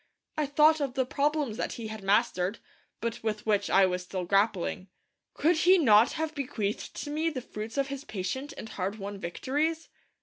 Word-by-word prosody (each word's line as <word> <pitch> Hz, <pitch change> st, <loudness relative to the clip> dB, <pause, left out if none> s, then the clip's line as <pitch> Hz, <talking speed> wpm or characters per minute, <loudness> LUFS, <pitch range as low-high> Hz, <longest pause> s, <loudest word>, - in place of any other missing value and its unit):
I 305 Hz, -2 st, 0 dB
thought 305 Hz, +2 st, +5 dB
of 270 Hz, -2 st, -2 dB
the 260 Hz, -1 st, +1 dB
problems 285 Hz, -3 st, 0 dB
that -, -, -2 dB
he 225 Hz, -2 st, -6 dB
had 220 Hz, -1 st, -7 dB
mastered, 200 Hz, -1 st, +1 dB, 0.4 s
but 230 Hz, 0 st, -3 dB
with 215 Hz, -1 st, -3 dB
which 205 Hz, -2 st, +1 dB
I 195 Hz, 0 st, +6 dB
was 180 Hz, -1 st, -1 dB
still 180 Hz, 0 st, -4 dB
grappling. 195 Hz, -1 st, +1 dB, 0.5 s
Could 330 Hz, +2 st, +3 dB
he 365 Hz, +4 st, +6 dB
not 230 Hz, -7 st, +5 dB
have 315 Hz, 0 st, -2 dB
bequeathed 225 Hz, -8 st, -3 dB
to 290 Hz, -, -6 dB
me 315 Hz, +2 st, 0 dB
the 290 Hz, -5 st, -4 dB
fruits 220 Hz, 0 st, -7 dB
of 275 Hz, 0 st, +1 dB
his 275 Hz, 0 st, -5 dB
patient 260 Hz, +6 st, -4 dB
and 225 Hz, -, -7 dB
hard 195 Hz, +1 st, -3 dB
won 200 Hz, -1 st, -6 dB
victories? 295 Hz, -, -2 dB
230 Hz, 190 wpm, -29 LUFS, 200-290 Hz, 0.5 s, I